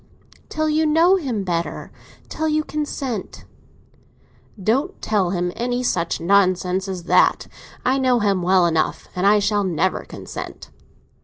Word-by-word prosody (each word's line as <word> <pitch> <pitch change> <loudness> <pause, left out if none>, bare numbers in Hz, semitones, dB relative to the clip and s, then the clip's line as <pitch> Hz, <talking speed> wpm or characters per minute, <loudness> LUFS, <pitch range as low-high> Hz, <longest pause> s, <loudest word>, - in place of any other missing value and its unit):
"Till 310 0 -1
you 310 +1 +2
know 335 +5 +4
him 250 - -3
better—till 170 - -5
you 305 0 +1
consent." 280 -8 -5 1.2
"Don't 275 - 0
tell 200 -5 0
him 180 -1 -1
any 245 +1 -2
such 170 -8 -1
nonsense 185 +1 +2
as 185 -2 -5
that. - - +3 0.4
I 265 +2 +2
know 255 -2 +3
him 200 -3 +1
well 180 0 +3
enough, 160 -2 0
and 180 +2 +1
I 210 +1 +6
shall 205 0 +1
never 185 0 0
consent." - - -9
205 Hz, 135 wpm, -21 LUFS, 180-270 Hz, 1.2 s, I